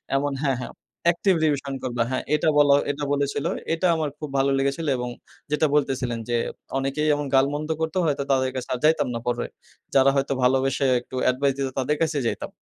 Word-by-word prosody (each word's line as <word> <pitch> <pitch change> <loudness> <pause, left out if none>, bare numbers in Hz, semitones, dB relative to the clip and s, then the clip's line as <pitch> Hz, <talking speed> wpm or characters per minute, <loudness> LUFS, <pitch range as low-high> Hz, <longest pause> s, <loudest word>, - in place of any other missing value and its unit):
এমন 140 +1 0
হ্যাঁ, 135 -3 +1
হ্যাঁ। - - -7 0.4
active 175 +1 +1
revision 140 -2 0
করবা, 120 -2 0
হ্যাঁ, 130 - -1
এটা 155 +1 +2
বলা 145 -1 +6 0.2
এটা 145 +1 -6
বলেছিলো। 140 +2 -1 0.2
এটা 180 +2 +1
আমার 155 -2 -1
খুব 150 - -6
ভালো 135 +1 +2
লেগেছিলো 140 +3 0
এবং 125 0 -3 0.4
যেটা 150 +1 +3
বলতেছিলেন 130 -5 0
যে, 120 - +2 0.4
অনেকেই 135 +3 -1
এমন 145 0 -3
গাল-মন্দ 145 +3 +1
করতো, 160 +3 -1
হয়তো 140 -3 0
তাদের 130 -1 +2
কাছে 130 -1 -5
আর 125 - -2
যাইতাম 160 +1 +3
না - - -2
পরে। 120 0 0 0.5
যারা 135 0 +6
হয়তো 135 0 +1
ভালোবেসে 135 +2 +2
একটু 125 - -11
অ্যাডভাইস 135 +2 +2
দিতো 135 -1 -1
তাদের 140 +3 +1
কাছেই 155 -5 +1
যাইতাম। - - -3
140 Hz, 190 wpm, -24 LUFS, 130-150 Hz, 0.5 s, বলা